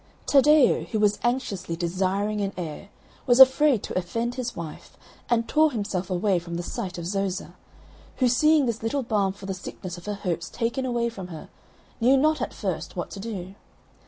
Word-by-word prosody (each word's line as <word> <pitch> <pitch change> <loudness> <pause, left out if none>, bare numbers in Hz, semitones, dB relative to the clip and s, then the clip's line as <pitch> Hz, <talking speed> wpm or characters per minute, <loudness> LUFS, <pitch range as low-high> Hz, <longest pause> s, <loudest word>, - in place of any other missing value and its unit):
Taddeo, 290 0 +5
who 220 - -2
was 210 -1 +2
anxiously 225 -9 -1
desiring 190 +4 -1
an 200 0 -2
heir, 175 +3 -6 0.4
was 245 0 +4
afraid 265 -2 +7
to - - -5
offend 230 +7 -2
his 250 -1 -4
wife 165 -2 -8 0.3
and 230 -1 +2
tore 310 0 +3
himself 200 -5 -3
away 185 0 +1
from 170 0 -7
the 175 - -3
sight 180 +1 -5
of 170 - -5
Zoza; 195 0 -2 0.6
who 255 - +2
seeing 300 +4 +4
this 230 -2 -2
little 265 +5 -1
balm 205 -4 +1
for 195 0 -11
the 195 - -3
sickness 185 -1 -7
of 175 - -14
her 210 - -2
hopes 180 -4 -3
taken 240 +3 -2
away 235 -1 0
from 195 -6 -8
her, 160 -3 -9 0.5
knew 255 +4 +5
not, 310 +3 +2
at - - -2
first, - - -4
what - - -4
to 200 - -7
do. 195 -3 -6
210 Hz, 190 wpm, -25 LUFS, 185-245 Hz, 0.6 s, afraid